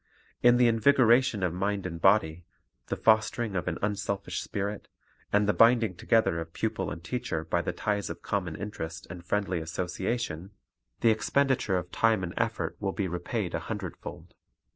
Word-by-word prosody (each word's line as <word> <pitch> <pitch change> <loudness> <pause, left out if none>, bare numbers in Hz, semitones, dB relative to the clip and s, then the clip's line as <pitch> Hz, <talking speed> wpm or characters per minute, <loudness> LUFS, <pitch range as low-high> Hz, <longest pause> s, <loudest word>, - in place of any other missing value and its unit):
In 120 0 +6
the 125 -1 +5
invigoration 120 -1 +4
of 90 -2 0
mind 100 +1 -1
and 85 -2 -5
body, 90 -4 +3 0.4
the - - -2
fostering 110 -1 +2
of 90 - -2
an 85 - -1
unselfish 100 -1 -2
spirit, 100 +1 -4 0.4
and 105 0 +3
the 105 - +3
binding 115 -3 +5
together 110 -2 +2
of 80 0 -8
pupil - - -2
and 80 - -7
teacher 85 -5 -3
by 80 - 0
the - - -2
ties 105 -1 -2
of 85 +1 -7
common 90 -6 -2
interest 85 -4 -6
and 85 0 -8
friendly 95 -1 -1
association, 90 +3 -3 0.5
the 115 - +5
expenditure 125 -3 +1
of 90 0 -5
time 110 -4 +2
and 85 -1 -4
effort 115 -1 -2
will 100 -2 -2
be 100 - -1
repaid 85 0 -3
a - - 0
hundredfold. - - -7
100 Hz, 165 wpm, -28 LUFS, 90-115 Hz, 0.5 s, In